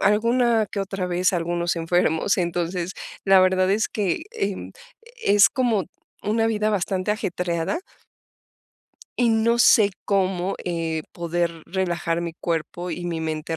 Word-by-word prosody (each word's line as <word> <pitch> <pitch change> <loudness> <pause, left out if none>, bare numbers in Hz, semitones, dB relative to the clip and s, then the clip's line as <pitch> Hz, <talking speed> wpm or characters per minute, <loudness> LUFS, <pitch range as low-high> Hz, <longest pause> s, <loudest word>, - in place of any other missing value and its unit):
alguna 230 +1 +3
que 200 - -3
otra 195 -1 -3
vez, 180 +1 +1
algunos 170 0 -1
enfermos, 165 +2 +1
entonces, 175 +1 -2 0.3
la 195 -1 +6
verdad 185 0 +3
es 215 +3 +1
que, 200 -5 -1
eh, 195 -1 -3 0.5
es 205 0 +6
como 235 - +1 0.4
una 225 +2 +1
vida 215 -1 +1
bastante 190 0 -1
ajetreada 180 - -2 1.4
y 245 -1 +3
no 225 +1 +2
sé 210 -3 +6 0.2
cómo, 190 -1 0
eh, 165 -3 -2
poder 170 -1 -2
relajar 175 -2 -1
mi 170 -1 -4
cuerpo 170 +1 -3
y 175 - -5
mi 170 -2 -3
mente 160 0 -3
185 Hz, 135 wpm, -23 LUFS, 170-205 Hz, 1.4 s, la